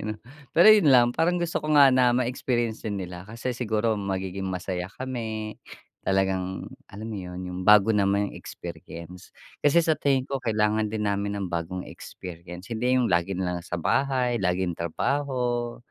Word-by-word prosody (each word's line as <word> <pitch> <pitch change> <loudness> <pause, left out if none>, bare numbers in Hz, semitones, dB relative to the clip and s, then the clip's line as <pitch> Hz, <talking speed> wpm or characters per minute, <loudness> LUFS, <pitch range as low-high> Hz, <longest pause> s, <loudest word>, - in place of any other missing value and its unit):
'no. 110 0 -3 0.4
Pero 170 +6 +7
yun 210 -8 +6
lang 120 -2 +7
parang 170 +6 +1
gusto 170 -1 -1
ko 155 0 -1
nga 140 -2 +8
na 125 -1 +4
may 125 -1 +1
experience 120 -3 -2
din 100 -2 -2
nila, 90 -1 -7
kasi 115 +3 -4
siguro 110 -2 0
magiging 95 -1 -3
masaya 90 -1 -3
kami, 110 -4 -4 0.4
talagang, 95 -1 0 0.2
alam 105 +3 -8
mo - - -4
yun, 90 -1 -7
yung 90 0 -5
bago 105 +1 +7
naman 100 0 +1
yung - - -11
experience. 85 +2 -10 0.3
Kasi 160 +3 +4
sa 160 - +3
tingin 135 -3 +2
ko 135 0 -4
kailangan 110 -2 +1
din 105 0 -3
namin 100 0 -1
ng 100 -1 -3
bagong 85 +2 -3
experience, 90 +3 -9
hindi 125 +3 +1
yung 125 -4 +2
lagi 85 +2 +1
nila 90 -1 -2
sa 90 - -4
bahay 130 - +1
laging 90 -2 0
trabaho. 120 - -1
105 Hz, 170 wpm, -26 LUFS, 95-125 Hz, 0.4 s, nga